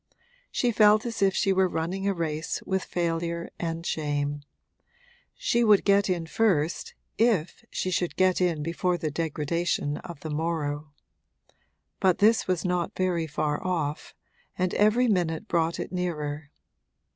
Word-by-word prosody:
She 245 - +1
felt 215 0 +5
as 230 -3 -4
if 195 -1 +3
she 195 -3 +2
were 190 -1 +3
running 180 +4 -2
a 200 - +2
race 160 -1 -2
with 190 0 -1
failure 170 0 -2
and 165 0 -3
shame; 145 -1 -1 0.9
she - - +1
would 210 -3 +5
get 200 0 +4
in 175 -3 0
first 170 -4 0 0.2
if 200 -8 +1
she 185 - -2
should 175 -1 -1
get 185 -1 +3
in 170 -4 +1
before 175 +2 0
the 160 -2 -3
degradation 160 -1 -1
of 170 -5 -9
the 155 - -5
morrow. 150 -2 -2 1.1
But 185 -2 +3
this 220 +2 +4
was 185 -1 0
not 180 -2 -1
very 175 -3 0
far 150 0 -2
off, 160 -5 -2 0.4
and 185 -1 0
every 215 +4 +4
minute 180 -1 0
brought 165 -2 0
it - - -4
nearer. 150 -5 -3
175 Hz, 145 wpm, -27 LUFS, 160-190 Hz, 1.1 s, felt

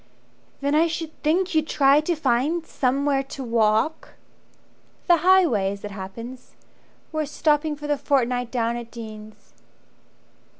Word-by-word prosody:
"Then 285 +1 0
I 320 +3 +4
should 325 -1 -5
think 350 +5 +1
you'd 315 -1 +1
try 280 0 +4
to 340 +3 -1
find 295 +4 0
Somewhere 275 +1 0
to 270 0 -8
walk 230 +5 0 0.5
" - - -36
"The 345 -2 +6
highway 320 - +3
as 200 - -11
it 205 - -6
happens 230 +6 -9 0.6
We're 310 -1 -1
stopping 300 0 +1
for 295 0 -9
the 295 -1 0
fortnight 250 -3 0
down 235 -1 -1
at 235 -1 -8
Dean's." 215 - -11
275 Hz, 140 wpm, -23 LUFS, 235-310 Hz, 0.6 s, The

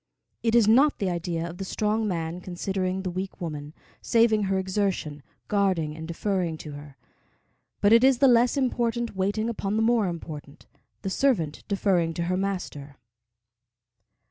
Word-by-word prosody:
It 230 0 +1
is 230 -3 +5
not 270 +7 +5
the 195 -3 -1
idea 170 -1 -2
of 175 +2 -9
the - - -3
strong 215 +3 0
man 170 -1 -3
considering 185 +1 -2
the 185 - -2
weak 190 +2 -5
woman, 150 -3 -6 0.3
saving 225 -3 +3
her 190 0 0
exertion, 190 -6 -1 0.3
guarding 185 -7 +1
and 160 0 -7
deferring 175 -1 -1
to 155 - -8
her; 145 -1 -11 0.8
but 205 +2 +5
it 230 +2 +6
is 265 -1 +5
the 275 - +5
less 245 +2 +4
important 240 -3 0
waiting 205 +4 0
upon 210 -3 -2
the 220 - +2
more 225 -3 +3
important, 155 -3 -7 0.4
the 195 - -2
servant 190 - +1
deferring 185 -5 +1
to 170 - -1
her 180 +2 0
master. 180 -7 -4
190 Hz, 160 wpm, -26 LUFS, 165-220 Hz, 0.8 s, it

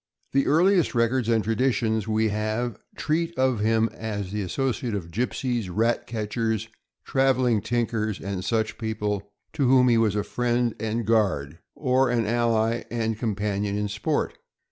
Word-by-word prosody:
The 135 0 +2
earliest 175 0 +3
records 115 0 +1
and 115 -2 +3
traditions 115 -2 0
we 110 0 +1
have 110 +2 -2 0.2
treat 165 +2 -1
of 130 -3 +2
him 110 +1 +2
as 105 -4 -4
the 105 0 -2
associate 120 +2 -2
of 85 -4 -5
gypsies, 120 0 -1
rat 115 +5 0
catchers, 110 0 -2 0.4
traveling 130 -4 +2
tinkers, 110 -3 -1
and 95 -1 -4
such 110 +1 -1
people, 105 -2 -2 0.2
to 145 -5 +1
whom 125 -1 +5
he 115 -1 +4
was 110 -3 +2
a 105 - 0
friend 120 0 0
and 110 +1 -2
guard, 95 -9 +1 0.2
or 130 -1 +2
an 120 -2 +1
ally 115 0 +1
and 115 -2 -2
companion. 105 -2 -1
in 105 0 -1
sport. 105 +1 -2
115 Hz, 150 wpm, -25 LUFS, 105-120 Hz, 0.4 s, whom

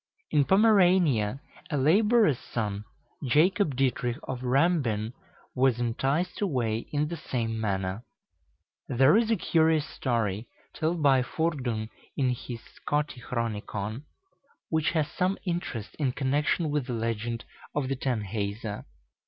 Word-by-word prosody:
In 145 -2 +4
Pomerania, 180 - +4 0.3
a 150 - -1
laborer's 205 - +4
son, 105 -3 -3 0.4
Jacob 155 - +3
Dietrich 125 -2 0
of 130 -1 -5
Rambin, 125 -5 +1 0.4
was 130 -2 +2
enticed 135 - -1
away 120 - -1
in 150 0 +1
the 170 +2 -5
same 115 -6 -2
manner. 95 0 -2 0.8
There 130 +6 +5
is 225 0 +3
a 225 - +4
curious 160 -4 +2
story 115 -4 -1 0.3
told 160 0 -1
by 135 -2 +5
Fordun 125 -7 -2 0.3
in 130 -3 +2
his 120 -1 -6
"Scotichronicon," 115 -4 -3 0.6
which 160 -1 +1
has 155 -3 +1
some 185 +1 0
interest 170 - -3
in 135 -4 +1
connection 145 +4 +1
with 145 -3 -1
the 125 - -3
legend 115 0 -2 0.3
of 145 -3 0
the 135 - -1
Tanhäuser. 105 -4 -3
130 Hz, 120 wpm, -28 LUFS, 115-160 Hz, 0.8 s, There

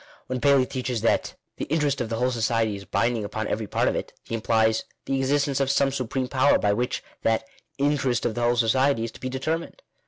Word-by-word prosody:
When 130 -1 -3
Paley 140 -2 +5
teaches 125 -3 -3
that 115 - +1
" - - -53
the - - -3
interest 145 -3 0
of 115 - -3
the 115 - -1
whole 125 +2 +1
society 115 -2 +1
is 100 0 -9
binding 115 -2 0
upon 110 +2 -3
every 110 -1 -2
part - - +1
of - - +1
it," - - -4
he - - -8
implies 110 0 +2 0.2
the 135 - -1
existence 140 +1 +1
of 135 -1 +1
some 140 0 +3
supreme 130 -1 -2
power 130 +2 +4
by 100 -1 +2
which 125 +5 -2 0.2
that 110 0 +1 0.3
"interest 140 -3 +1
of 115 - +1
the 120 - -3
whole 120 +1 +3
society" 120 +2 +2
is 115 - -3
to - - -14
be 130 - -4
determined. 160 - -3
125 Hz, 225 wpm, -25 LUFS, 115-135 Hz, 0.3 s, Paley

